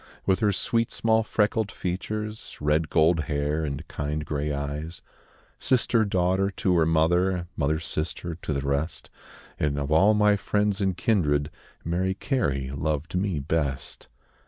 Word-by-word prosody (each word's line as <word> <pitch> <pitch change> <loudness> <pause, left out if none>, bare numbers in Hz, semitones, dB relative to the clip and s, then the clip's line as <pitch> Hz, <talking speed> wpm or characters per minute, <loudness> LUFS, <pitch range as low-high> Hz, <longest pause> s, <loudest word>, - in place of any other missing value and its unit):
With 95 -1 +2
her 105 -2 +3
sweet 115 +4 0
small 110 0 +2
freckled 105 -1 0
features, 105 +4 -4
Red 75 +2 +1
gold 80 0 +3
hair, 75 +1 -1
and 70 -3 -4
kind 75 +1 -3
grey 75 0 -2
eyes; 75 +4 -4 0.6
Sister, 120 -3 +2
daughter, 95 0 +1
to 95 -1 0
her 80 -1 +3
mother, 85 +3 +2
Mother, 75 +1 0
sister, 85 +1 -4
to 80 -1 -6
the 70 -2 0
rest 70 +4 -2 0.5
And 70 -1 0
of 70 +1 -2
all 100 +7 +5
my 105 -1 +4
friends 105 0 0
and 95 -2 0
kindred, 75 - +1 0.3
Mary 90 +3 0
Carey 70 - -1
loved 75 +2 -2
me 90 -2 0
best. 70 -3 -2
85 Hz, 145 wpm, -26 LUFS, 75-100 Hz, 0.6 s, all